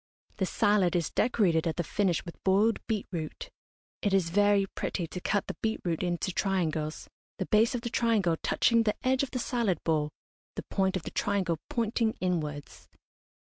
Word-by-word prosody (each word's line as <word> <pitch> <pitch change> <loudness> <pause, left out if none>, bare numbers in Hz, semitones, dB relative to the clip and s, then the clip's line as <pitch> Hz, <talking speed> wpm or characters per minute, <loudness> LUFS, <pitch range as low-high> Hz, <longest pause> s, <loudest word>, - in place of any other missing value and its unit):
The 190 - 0
salad 200 -4 +2
is 170 -3 0
decorated 180 -9 +2
at 160 - -1
the 175 - -1
finish 180 -1 0
with 170 - -10
boiled 205 +4 +3
beet 215 -3 -1
root. 160 -4 -5 0.5
It 200 -2 +2
is 175 -4 +1
very 205 +1 +4
pretty 185 -2 -3
to 180 +3 -7
cut 205 +1 0
the - - -5
beet 220 0 0
root 165 -2 -1
into 175 +1 -1
triangles, 160 -6 -1 0.3
the - - -2
base 225 +3 +3
of 240 - -2
the 235 - -3
triangle 220 -8 +2
touching 230 -1 +3
the 215 -2 +1
edge 260 0 +3
of 275 - -1
the 255 - -4
salad 235 - 0
bowl, 155 -2 +1 0.5
the - - -4
point 190 -1 +1
of 175 - -7
the - - -6
triangle 190 -6 0
pointing 225 -1 0
inwards. 150 -6 -3
195 Hz, 185 wpm, -29 LUFS, 170-220 Hz, 0.5 s, very